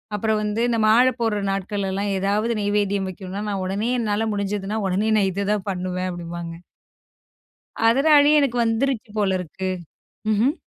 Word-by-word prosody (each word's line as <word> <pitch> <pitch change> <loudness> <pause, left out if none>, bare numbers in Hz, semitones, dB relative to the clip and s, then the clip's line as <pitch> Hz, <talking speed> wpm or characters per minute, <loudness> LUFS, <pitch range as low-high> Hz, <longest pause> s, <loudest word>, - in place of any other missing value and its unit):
அப்புறம் 215 +1 0
வந்து 210 +2 -1
இந்த 235 - +1
மாலை 245 +4 +5
போட்ற 225 -3 0
நாட்கள்லாம் 195 0 -2
ஏதாவது 205 +4 0
நெய்வேத்தியம் 205 -1 0
வைக்கணும்னா 190 +2 -6
நான் 200 -2 -2
உடனே 200 +5 -1
என்னால 215 -1 0
முடிஞ்சுதுனா 200 +1 -2
உடனே 200 +4 0
நான் 195 -2 +3
இததான் 200 +1 -1
பண்ணுவேன். 185 -1 -2
அப்படிம்பாங்க. 170 -1 -6 1.4
அதனாலே 290 +4 +5
எனக்கு 245 -4 0
வந்துருச்சு 230 0 -1
போல 195 -2 +2
இருக்கு. 185 +2 -4 0.6
ம்ஹ்ம். 235 +8 +2
205 Hz, 135 wpm, -23 LUFS, 190-225 Hz, 1.4 s, மாலை